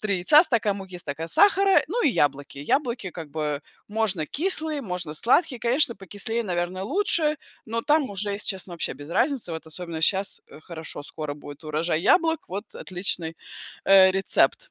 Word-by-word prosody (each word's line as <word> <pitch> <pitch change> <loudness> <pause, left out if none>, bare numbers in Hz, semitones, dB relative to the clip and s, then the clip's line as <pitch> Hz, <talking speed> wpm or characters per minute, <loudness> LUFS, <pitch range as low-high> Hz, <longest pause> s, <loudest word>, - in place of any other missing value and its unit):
3 200 -3 0
яйца, 295 - +6
стакан 225 - +1
муки, 185 -2 -9
стакан 160 +1 -5
сахара, 395 - +5
ну 470 +9 -1
и - - +4
яблоки. 145 - 0
Яблоки, 235 - -1
как 160 -4 -9
бы, 150 -1 -3 0.2
можно 205 -7 -1
кислые, 315 - 0
можно 180 -6 -4
сладкие, 250 - +2
конечно 240 0 +2
покислее, 205 +4 -3
наверное, 180 -1 -3
лучше, 315 - +1 0.3
но 230 +1 -2
там 295 -5 +2
уже, 200 +1 -1
если 200 - -3
честно, 190 -2 -3
вообще 165 - -3
без 145 +3 -11
разницы, 255 - 0
вот 160 - -6
особенно 165 0 -6
щас, 195 +4 +1
э, - - -13
хорошо- 160 -3 -7
скоро 150 -2 -5
будет 145 +1 -11
урожай 155 +1 -1
яблок. 325 - +2
Вот 200 +4 -6
отличный 175 -3 -1 0.5
э, 190 -1 +7
рецепт 195 - +2
195 Hz, 165 wpm, -25 LUFS, 165-255 Hz, 0.5 s, э